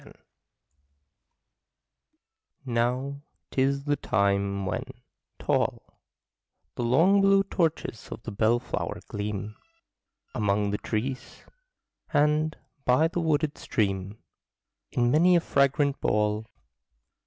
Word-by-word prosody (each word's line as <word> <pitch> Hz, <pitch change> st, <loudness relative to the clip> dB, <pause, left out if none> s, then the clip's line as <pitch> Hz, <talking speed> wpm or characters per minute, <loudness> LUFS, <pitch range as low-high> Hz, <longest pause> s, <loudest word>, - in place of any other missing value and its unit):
JULY -, -, -15 dB, 2.5 s
Now 125 Hz, +3 st, -1 dB, 0.3 s
'tis 140 Hz, +1 st, +1 dB
the 145 Hz, 0 st, +1 dB
time 100 Hz, -3 st, 0 dB
when, 110 Hz, +6 st, -2 dB, 0.5 s
tall, -, -, -1 dB, 0.7 s
The -, -, -5 dB
long 165 Hz, +12 st, +4 dB
blue 195 Hz, 0 st, +5 dB
torches 165 Hz, -, -2 dB
of -, -, -7 dB
the 115 Hz, -, -5 dB
bellflower 115 Hz, +4 st, 0 dB
gleam 105 Hz, 0 st, -4 dB, 0.8 s
Among 105 Hz, -3 st, +1 dB
the 105 Hz, -, -2 dB
trees; 130 Hz, +4 st, -4 dB, 0.7 s
and, 150 Hz, +1 st, +2 dB, 0.3 s
by 150 Hz, +6 st, +3 dB
the 175 Hz, -, -2 dB
wooded 155 Hz, -2 st, 0 dB
stream. 100 Hz, -1 st, -1 dB, 0.7 s
In 120 Hz, 0 st, +2 dB
many 175 Hz, +5 st, +5 dB
a -, -, +6 dB
fragrant 140 Hz, -2 st, +1 dB
ball. 105 Hz, +1 st, 0 dB
125 Hz, 95 wpm, -27 LUFS, 105-150 Hz, 2.5 s, a